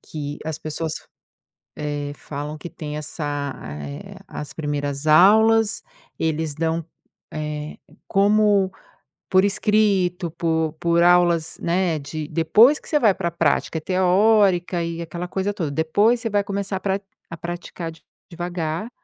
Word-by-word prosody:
que 145 Hz, -1 st, -6 dB
as 160 Hz, -1 st, -3 dB
pessoas, 155 Hz, +1 st, -4 dB, 0.8 s
eh, 145 Hz, -1 st, -3 dB
falam 145 Hz, +1 st, -6 dB
que 170 Hz, +3 st, -8 dB
tem 150 Hz, -2 st, -6 dB
essa 145 Hz, -2 st, -4 dB
eh, 70 Hz, -1 st, -7 dB
as 150 Hz, -, -7 dB
primeiras 145 Hz, -1 st, -3 dB
aulas, 220 Hz, +7 st, +5 dB, 0.4 s
eles 160 Hz, -1 st, -1 dB
dão 165 Hz, +1 st, -1 dB, 0.5 s
eh, 150 Hz, 0 st, -5 dB, 0.3 s
como 200 Hz, -1 st, +3 dB, 0.6 s
por 185 Hz, 0 st, +5 dB
escrito, 200 Hz, -4 st, +1 dB
por 160 Hz, -2 st, 0 dB
por 170 Hz, 0 st, +3 dB
aulas 175 Hz, -2 st, +3 dB
né, 170 Hz, -2 st, +1 dB
de 150 Hz, +2 st, -6 dB
depois 220 Hz, -, +5 dB
que -, -, -17 dB
você 300 Hz, -, +2 dB
vai 220 Hz, -8 st, +4 dB
para 185 Hz, -2 st, -3 dB
a -, -, -2 dB
prática. 165 Hz, 0 st, 0 dB
É -, -, -3 dB
teórica 185 Hz, -1 st, +3 dB
e 170 Hz, 0 st, -3 dB
aquela 170 Hz, +1 st, -5 dB
coisa 195 Hz, +2 st, -2 dB
toda, 170 Hz, -7 st, -3 dB
depois 205 Hz, +11 st, +2 dB
você 225 Hz, -, -2 dB
vai 205 Hz, -1 st, +1 dB
começar 200 Hz, -1 st, -3 dB
pra 195 Hz, +1 st, -1 dB, 0.3 s
a 165 Hz, -, -6 dB
praticar 175 Hz, 0 st, -6 dB
de 165 Hz, -, -17 dB, 0.3 s
devagar 175 Hz, +3 st, -3 dB
170 Hz, 140 wpm, -22 LUFS, 155-195 Hz, 0.8 s, aulas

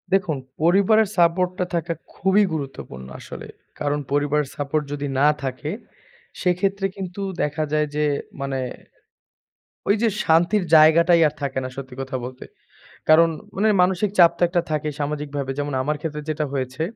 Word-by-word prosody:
দেখুন 185 Hz, -6 st, +2 dB, 0.2 s
পরিবারের 200 Hz, +5 st, +4 dB
সাপোর্ট 175 Hz, +1 st, +3 dB
টা 180 Hz, -, +1 dB
থাকা 170 Hz, 0 st, -1 dB, 0.2 s
খুবই 190 Hz, +3 st, +3 dB
গুরুত্বপূর্ণ 135 Hz, -, -6 dB
আসলে। -, -, -9 dB, 0.3 s
কারণ 145 Hz, 0 st, 0 dB
পরিবার 145 Hz, +1 st, +2 dB
সাপোর্ট 145 Hz, +1 st, -1 dB
যদি 145 Hz, 0 st, -3 dB
না 145 Hz, -, +5 dB, 0.2 s
থাকে, 130 Hz, +2 st, -4 dB, 0.7 s
সেক্ষেত্রে 195 Hz, +2 st, +1 dB
কিন্তু 190 Hz, 0 st, -6 dB, 0.2 s
দেখা 150 Hz, +1 st, -1 dB
যায় 150 Hz, 0 st, +2 dB
যে 150 Hz, 0 st, +1 dB, 0.4 s
মানে 135 Hz, -1 st, -2 dB, 1.3 s
ওই 200 Hz, -, +4 dB
যে 235 Hz, -, +4 dB, 0.2 s
শান্তির 175 Hz, +5 st, +3 dB
জায়গাটাই 165 Hz, +2 st, +6 dB
আর 150 Hz, -, -4 dB
থাকে 135 Hz, -2 st, -3 dB
না 130 Hz, -, -4 dB
সত্যি 130 Hz, -2 st, -8 dB
কথা 130 Hz, 0 st, -5 dB
বলতে। 125 Hz, 0 st, -8 dB, 0.7 s
কারণ 165 Hz, +2 st, +7 dB, 0.3 s
মানে 210 Hz, +3 st, +2 dB
মানসিক 190 Hz, +2 st, +1 dB
চাপ 170 Hz, -2 st, +8 dB
তো -, -, -3 dB
একটা 175 Hz, 0 st, +1 dB
থাকেই 150 Hz, -1 st, -1 dB
সামাজিকভাবে। 145 Hz, -2 st, -3 dB
যেমন 145 Hz, -1 st, -2 dB
আমার 150 Hz, +3 st, -1 dB
ক্ষেত্রে 150 Hz, -1 st, -4 dB
যেটা 155 Hz, 0 st, -1 dB
হয়েছে, 130 Hz, +2 st, -3 dB
155 Hz, 150 wpm, -22 LUFS, 145-180 Hz, 1.3 s, চাপ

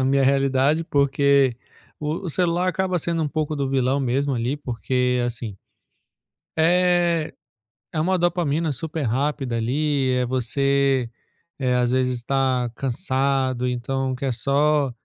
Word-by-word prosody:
a -, -, +1 dB
minha 135 Hz, +1 st, +3 dB
realidade, 135 Hz, +3 st, +2 dB
porque 140 Hz, -3 st, +2 dB, 0.4 s
o 155 Hz, +5 st, -3 dB
o -, -, -2 dB
celular 175 Hz, +2 st, +1 dB
acaba 185 Hz, 0 st, 0 dB
sendo 165 Hz, 0 st, -1 dB
um 150 Hz, -, -1 dB
pouco 155 Hz, 0 st, -2 dB
do 140 Hz, -, -1 dB
vilão 135 Hz, 0 st, +1 dB
mesmo 135 Hz, +1 st, 0 dB
ali 125 Hz, +5 st, -2 dB
porque 125 Hz, -1 st, -1 dB
é, -, -, 0 dB
assim 115 Hz, -4 st, -5 dB, 1.0 s
é 175 Hz, -1 st, +2 dB, 0.6 s
é 155 Hz, -, -1 dB
uma 185 Hz, +4 st, +2 dB
dopamina 165 Hz, -3 st, 0 dB
super 155 Hz, +4 st, -4 dB
rápida 135 Hz, 0 st, -1 dB
ali, 135 Hz, +3 st, 0 dB
é 125 Hz, 0 st, +1 dB
você, 135 Hz, 0 st, +1 dB, 0.5 s
eh, 130 Hz, -2 st, +1 dB
às 125 Hz, -1 st, +2 dB
vezes 125 Hz, -2 st, 0 dB
tá 130 Hz, -3 st, 0 dB
cansado 130 Hz, -2 st, 0 dB
então 130 Hz, +2 st, -2 dB
quer 130 Hz, +1 st, -2 dB
só, 140 Hz, +4 st, +1 dB
140 Hz, 140 wpm, -23 LUFS, 125-155 Hz, 1.0 s, minha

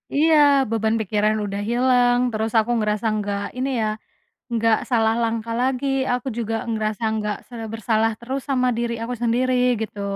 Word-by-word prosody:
Iya 315 Hz, +2 st, +4 dB, 0.3 s
beban 220 Hz, 0 st, 0 dB
pikiran 215 Hz, +1 st, +1 dB
udah 200 Hz, 0 st, -4 dB
hilang 245 Hz, 0 st, +3 dB
terus 220 Hz, +1 st, -2 dB
aku 225 Hz, +2 st, +3 dB
ngerasa 210 Hz, 0 st, -1 dB
nggak 205 Hz, -1 st, -2 dB, 0.2 s
ini 265 Hz, +2 st, -1 dB
ya, 215 Hz, -, +1 dB, 0.7 s
nggak 225 Hz, -1 st, +3 dB
salah 225 Hz, -2 st, +3 dB
langkah 230 Hz, 0 st, -2 dB
lagi 260 Hz, +1 st, 0 dB, 0.3 s
aku 250 Hz, +1 st, -2 dB
juga 225 Hz, -1 st, -2 dB, 0.2 s
ngerasa 215 Hz, -1 st, -2 dB
nggak 210 Hz, -1 st, -2 dB
sebersalah 225 Hz, -1 st, -1 dB
terus 260 Hz, +3 st, -4 dB
sama 255 Hz, -2 st, +2 dB
diri 235 Hz, 0 st, -1 dB
aku 240 Hz, +2 st, -3 dB
sendiri 245 Hz, +2 st, +1 dB, 0.3 s
gitu. 210 Hz, -2 st, -5 dB
225 Hz, 155 wpm, -22 LUFS, 215-245 Hz, 0.7 s, Iya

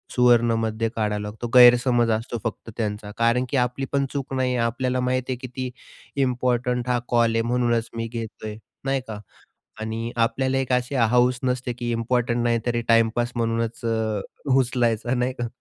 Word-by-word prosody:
सुवर्णमध्य 115 Hz, -2 st, +3 dB
काढावं 105 Hz, -1 st, -1 dB
लागतो, 105 Hz, +3 st, -5 dB
गैरसमज 120 Hz, -1 st, +6 dB
असतो 115 Hz, +2 st, -2 dB
फक्त 115 Hz, 0 st, -5 dB
त्यांचा. 105 Hz, -2 st, -3 dB
कारण 115 Hz, +2 st, +2 dB
की 140 Hz, -, 0 dB
आपली 125 Hz, +2 st, 0 dB
पण 140 Hz, 0 st, +2 dB
चूक 135 Hz, -2 st, -4 dB
नाही 130 Hz, -1 st, 0 dB
आहे 120 Hz, -1 st, +1 dB
आपल्याला 125 Hz, +2 st, -1 dB
माहीत 125 Hz, 0 st, 0 dB
आहे 130 Hz, -, 0 dB
किती 130 Hz, 0 st, -5 dB, 0.6 s
इम्पॉर्टंट 125 Hz, 0 st, 0 dB
हा 125 Hz, -1 st, +2 dB
कॉल 120 Hz, -1 st, +3 dB
आहे 115 Hz, -, +3 dB
म्हणूनच 120 Hz, -1 st, 0 dB
मी 115 Hz, 0 st, -3 dB
घेतोय, 110 Hz, -2 st, -6 dB, 0.3 s
नाही 135 Hz, 0 st, 0 dB
का? 110 Hz, -2 st, -6 dB, 0.6 s
आणि 115 Hz, +2 st, -4 dB
आपल्याला 130 Hz, +3 st, +1 dB
एक 130 Hz, -1 st, -1 dB
अशी 125 Hz, +2 st, 0 dB
हाऊस 125 Hz, +1 st, +3 dB
नसते 125 Hz, -1 st, -1 dB
की 120 Hz, 0 st, -4 dB
इम्पॉर्टंट 120 Hz, +1 st, 0 dB
नाही 120 Hz, -1 st, +2 dB
तरी 120 Hz, -1 st, 0 dB
टाईपास 115 Hz, +1 st, +3 dB
म्हणूनच 115 Hz, 0 st, -1 dB
अ, 110 Hz, -2 st, 0 dB, 0.4 s
उचलायचा 120 Hz, -2 st, +1 dB
नाही 125 Hz, +1 st, 0 dB
का? 120 Hz, -, 0 dB
120 Hz, 165 wpm, -24 LUFS, 115-125 Hz, 0.6 s, गैरसमज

